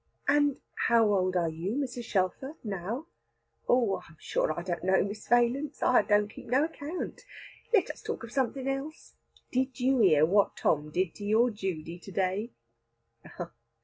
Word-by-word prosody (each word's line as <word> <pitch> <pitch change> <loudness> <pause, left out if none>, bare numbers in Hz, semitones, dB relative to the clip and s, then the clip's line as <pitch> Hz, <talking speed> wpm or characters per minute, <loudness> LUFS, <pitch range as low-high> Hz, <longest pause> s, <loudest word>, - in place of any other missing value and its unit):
"And 290 -1 +3 0.3
how 230 -1 +5
old 185 -1 +1
are 175 -2 +2
you, 165 +7 -3
Mrs. 255 -4 -3
Shelfer, 200 - -1
now?" 210 - -4 0.6
"Oh 235 -6 +3
I - - -13
am 155 - -18
sure - - 0
I - - -5
don't 175 -2 -3
know, 190 +1 +3
Miss 205 +2 -6
Valence, 245 +5 +2
I 250 - +5
don't 205 -1 +3
keep 215 - -12
no 260 +5 +3
account. 320 +1 -5 0.5
Let 440 -7 +3
us - - -14
talk 450 - -4
of 230 - -8
something 265 +1 -1
else. 275 +4 -4 0.4
Did 260 +1 -1
you 260 +1 +3
hear 155 -8 +6
what 200 +4 +2
Tom 150 -1 +1
did 180 +2 -1
to 205 - -8
your 225 +4 +3
Judy 175 -5 -4
to 195 - -11
day?" 190 +5 -1
220 Hz, 170 wpm, -29 LUFS, 185-265 Hz, 0.6 s, hear